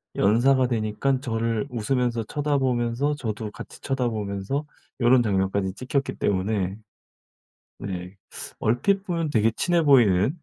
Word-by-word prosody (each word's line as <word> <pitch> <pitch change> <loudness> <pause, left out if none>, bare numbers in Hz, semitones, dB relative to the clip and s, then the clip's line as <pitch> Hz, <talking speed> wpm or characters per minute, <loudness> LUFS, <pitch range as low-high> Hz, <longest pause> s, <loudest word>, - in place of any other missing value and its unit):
연사가 125 +5 +3
되니깐 120 +3 0
저를 115 -1 -1
웃으면서 120 -1 -1
쳐다 145 +5 -1
보면서 130 +2 0
저도 110 -5 -4
같이 - - -10
쳐다 135 -3 -1
보면서 105 +6 -3 0.4
요런 120 +1 +5
장면까지 95 -2 0
찍혔기 130 +3 -2
때문에 100 0 -1 1.0
네. 90 -1 -6 0.4
얼핏 190 - +1
보면 165 -4 -1
되게 110 -3 +2
친해 175 -2 +2
보이는 120 - +4
120 Hz, 290 characters per minute, -25 LUFS, 105-135 Hz, 1.0 s, 요런